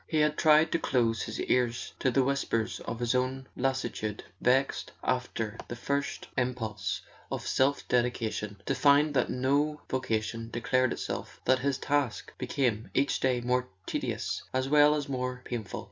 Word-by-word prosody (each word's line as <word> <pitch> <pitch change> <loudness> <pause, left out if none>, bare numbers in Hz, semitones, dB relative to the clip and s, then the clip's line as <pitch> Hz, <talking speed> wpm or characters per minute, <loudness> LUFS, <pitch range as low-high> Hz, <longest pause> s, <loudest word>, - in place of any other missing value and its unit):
He 160 - -1
had 150 0 +3
tried 155 +1 +5
to 170 - +2
close 115 -6 +1
his 110 - -4
ears 120 -1 0
to 130 - +2
the 130 +1 +3
whispers 125 -4 0
of 115 - -5
his 120 0 +1
own 130 +1 0
lassitude, 125 -5 -2 0.2
vexed, 130 +2 +2
after 125 -4 -1
the 120 - -5
first 140 +4 -2
impulse 110 - -2 0.3
of - - -3
self 140 +2 +1
dedication, 115 -4 0
to - - +1
find 145 +3 +4
that 130 -3 +2
no 145 +4 +1
vocation 115 -2 -1
declared 130 +2 +1
itself, - - -4
that 130 0 +4
his 140 0 0
task 140 -7 -1
became 115 -5 0
each 140 +1 +2
day 125 -2 +1
more 125 +1 +1 0.2
tedious - - -2
as 130 0 +1
well 150 +1 +6
as 145 -1 -2
more 125 -1 -3
painful. 115 -6 -4
125 Hz, 160 wpm, -29 LUFS, 120-140 Hz, 0.3 s, well